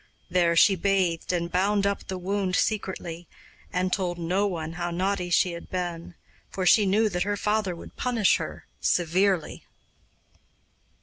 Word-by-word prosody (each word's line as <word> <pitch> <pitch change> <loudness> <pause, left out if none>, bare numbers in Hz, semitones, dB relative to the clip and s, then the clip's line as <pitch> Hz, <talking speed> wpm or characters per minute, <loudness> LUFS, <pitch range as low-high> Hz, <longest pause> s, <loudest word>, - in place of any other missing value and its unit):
There 175 -2 +3
she 195 +3 +6
bathed 185 -3 0
and 170 -1 -2
bound 200 +3 +1
up 200 0 -1
the 190 - -4
wound 190 0 -1
secretly, 175 -6 -2 0.4
and 185 0 0
told 180 -3 -1
no 180 +4 0
one 165 -4 -4
how 175 0 -3
naughty 180 +1 -1
she 180 +1 +3
had 170 0 -9
been, 175 -2 -4 0.3
for 185 - -3
she 205 +2 +5
knew 215 +3 +3
that 180 -4 -2
her 205 +1 0
father 210 -3 0
would - - -12
punish 235 -5 +2
her - - -7
severely. 180 0 +1
185 Hz, 150 wpm, -26 LUFS, 175-200 Hz, 0.4 s, she